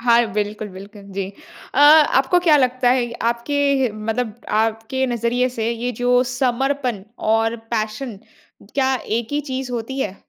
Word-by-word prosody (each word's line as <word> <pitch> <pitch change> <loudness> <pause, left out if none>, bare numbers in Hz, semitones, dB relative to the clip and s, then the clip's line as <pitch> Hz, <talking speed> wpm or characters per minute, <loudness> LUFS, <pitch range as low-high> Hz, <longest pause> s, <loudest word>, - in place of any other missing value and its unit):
हाँ, 235 0 +4
बिल्कुल, 210 0 -3
बिल्कुल 200 +2 -11
जी। 195 -1 -3 0.5
अ, - - 0
आपको 295 +1 +6
क्या 320 -4 +5
लगता 255 -2 +2
है 245 -2 +1 0.2
आपके 235 +5 -4 0.3
हे 255 -4 +1
मतलब 220 +2 -3 0.2
आपके 225 +4 -1
नज़रिए 240 +1 0
से 225 0 0
ये 235 +1 -2
जो 245 0 +4
समर्पण 255 -3 0 0.3
और 225 +1 +1 0.2
पैशन 215 0 -3 0.6
क्या 265 -1 +2
एक 225 +1 -1
ही 295 - +1
चीज़ 260 -1 -3
होती 240 +3 -4
है? 200 -6 -3
240 Hz, 150 wpm, -20 LUFS, 220-260 Hz, 0.6 s, आपको